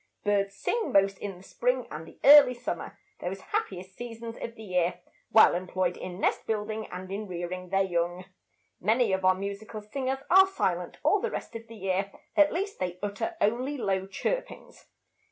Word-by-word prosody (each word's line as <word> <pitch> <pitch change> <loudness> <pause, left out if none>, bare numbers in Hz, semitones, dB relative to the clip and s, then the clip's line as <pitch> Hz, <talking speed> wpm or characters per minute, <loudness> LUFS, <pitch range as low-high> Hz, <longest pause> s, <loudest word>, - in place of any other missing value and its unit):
Birds 200 -1 +1
sing 460 - -1
most 195 0 +3
in 195 -3 -5
the 180 - -15
spring 250 +5 0
and 155 +2 -7
the - - -15
early 280 -3 +9
summer, 240 - -5 0.2
those 190 +2 -4
happiest 185 0 -3
seasons 230 -1 -7
of 230 - -5
the 220 - -10
year, 180 -3 0 0.3
while 220 - +7
employed 180 0 -1
in 180 0 -7
nest - - 0
building 215 0 -2
and 185 +1 -8
in 205 +2 -4
rearing 180 0 -5
their 195 +1 +3
young. 175 0 -1 0.5
Many 220 +1 +2
of 190 0 0
our 185 0 +5
musical 200 +3 -5
singers 265 +4 -3
are 380 +2 +7
silent 385 - -2
all 410 - +3
the 470 - -1
rest 235 - -6
of 230 0 -7
the 230 - -11
year; 195 -1 -1 0.2
at 300 -1 +5
least 395 +4 -3
they 180 -1 -2
utter 205 +12 -3
only 255 +7 +1
low 190 -5 -1
chirpings. - - -4
205 Hz, 180 wpm, -28 LUFS, 185-240 Hz, 0.5 s, early